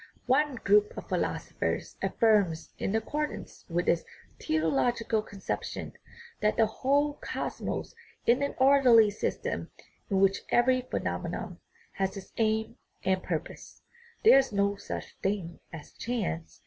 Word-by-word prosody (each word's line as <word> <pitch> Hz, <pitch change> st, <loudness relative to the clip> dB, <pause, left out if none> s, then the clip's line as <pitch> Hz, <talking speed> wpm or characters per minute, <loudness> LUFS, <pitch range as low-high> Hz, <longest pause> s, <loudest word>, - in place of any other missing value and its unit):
One 275 Hz, +2 st, +2 dB
group 420 Hz, -, +3 dB
of -, -, -7 dB
philosophers -, -, -2 dB
affirms, 200 Hz, -8 st, +2 dB
in 195 Hz, -, -1 dB
accordance 300 Hz, +7 st, -3 dB
with 175 Hz, +1 st, -1 dB
its 170 Hz, -, +3 dB, 0.4 s
teleological 165 Hz, -, +1 dB
conception, 200 Hz, -2 st, -5 dB, 0.5 s
that 210 Hz, -, +1 dB
the 225 Hz, -, +5 dB
whole 285 Hz, +6 st, +1 dB
cosmos -, -, -4 dB, 0.3 s
is 240 Hz, +2 st, +4 dB
an 280 Hz, -, -2 dB
orderly 260 Hz, -5 st, +6 dB
system, 205 Hz, -, -3 dB, 0.4 s
in 195 Hz, -2 st, +2 dB
which 195 Hz, 0 st, +3 dB
every 255 Hz, +1 st, +4 dB
phenomenon 255 Hz, -, -4 dB, 0.3 s
has 195 Hz, +1 st, -2 dB
its 195 Hz, -, -10 dB
aim 220 Hz, 0 st, 0 dB, 0.3 s
and 190 Hz, 0 st, +2 dB
purpose; 165 Hz, -4 st, -5 dB, 0.4 s
there 425 Hz, -11 st, +8 dB
is 270 Hz, -2 st, -1 dB
no 200 Hz, 0 st, +1 dB
such 200 Hz, -, -7 dB
thing 190 Hz, -4 st, -2 dB
as 160 Hz, -3 st, -9 dB
chance. 205 Hz, -9 st, -4 dB
220 Hz, 125 wpm, -29 LUFS, 190-255 Hz, 0.5 s, there